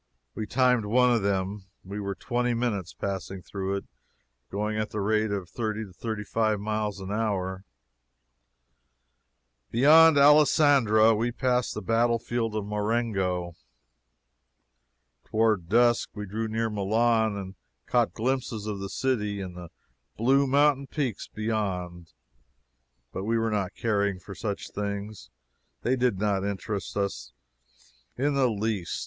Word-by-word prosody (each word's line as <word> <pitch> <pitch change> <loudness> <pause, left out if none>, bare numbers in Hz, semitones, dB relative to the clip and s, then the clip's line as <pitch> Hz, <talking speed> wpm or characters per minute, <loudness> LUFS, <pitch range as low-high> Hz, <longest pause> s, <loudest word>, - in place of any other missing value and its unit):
We 110 - -5
timed 125 -3 +2
one 125 +3 +4
of 115 -2 +2
them. 100 0 -1 0.2
We 100 +2 -6
were 100 -1 -3
twenty 120 +2 -1
minutes 105 -7 -2
passing 95 -1 -5
through 95 0 -3
it, 100 - -4 0.6
going 105 +2 -2
at 110 0 -2
the 105 - -4
rate 110 +2 +1
of 100 -3 -3
thirty 110 +3 -3
to 95 - -15
thirty 110 +1 -4
five 110 0 0
miles 105 -1 -2
an 95 +1 -6
hour. 95 -3 -2 2.0
Beyond 155 +5 +6
Alessandria 140 -6 +5
we 115 +3 0
passed 125 0 0
the - - -5
battle 115 +1 +2
field 115 -1 -2
of 105 -2 -2
Marengo. 105 -5 -1 1.7
Toward 110 -6 +1
dusk 120 +2 +3
we 105 -1 -5
drew 110 +3 -3
near 110 0 -1
Milan 110 +2 +2
and 95 -1 -6 0.3
caught 120 -2 +1
glimpses 115 -3 -2
of 105 -2 -4
the 100 0 -5
city 105 -6 -1
and 90 -2 -6
the 90 -1 -9 0.5
blue 135 +5 +3
mountain 140 0 +3
peaks 135 -9 -3
beyond. 95 -6 -3 1.0
But 95 - -4
we 115 +1 +1
were 115 0 0
not 100 -3 -2
caring 100 -4 0
for 100 +2 -10
these 100 +1 -5
things 100 0 -5 0.5
they 125 - +2
did 125 -5 +1
not 100 -1 0
interest 100 0 -4
us 95 -12 -3 0.8
in 140 +3 +1
the 135 -2 +3
least. 105 -4 -2
110 Hz, 140 wpm, -27 LUFS, 100-120 Hz, 2.0 s, Beyond